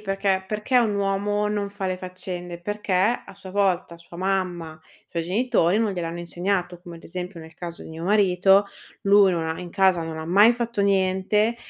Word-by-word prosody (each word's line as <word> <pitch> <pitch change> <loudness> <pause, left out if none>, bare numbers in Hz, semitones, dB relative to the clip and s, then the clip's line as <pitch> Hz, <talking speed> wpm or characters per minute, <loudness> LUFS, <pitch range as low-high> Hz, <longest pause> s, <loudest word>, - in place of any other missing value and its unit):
perché 195 -1 0
perché 210 +5 +1
un 220 -4 +2
uomo 200 +1 0
non 205 -1 -2
fa 200 -1 -4
le 185 0 -2
faccende? 180 -1 -7
Perché, 205 +2 -4
a 195 +2 +1
sua 190 -1 -10
volta, 185 -3 0
sua 170 0 -13
mamma, 180 -4 -2
i - - -27
suoi 170 -1 -2
genitori 205 -1 +2
non 220 -3 +1
gliel'hanno 170 -2 -4
insegnato, 175 0 -2
come, 175 -2 -10
ad - - -15
esempio, 180 +1 -6
nel 160 0 -13
caso 170 0 -8
di - - -10
mio 160 +1 -7
marito: 195 0 +4 0.4
lui 200 -1 +5
non 165 -2 -1
ha 160 0 -3
in 180 -1 -8
casa 190 -2 +3
non 160 -1 -6
ha 160 - -5
mai 200 +7 +6
fatto 235 -2 -3
niente, 200 +3 +2
190 Hz, 195 wpm, -24 LUFS, 175-205 Hz, 0.4 s, mai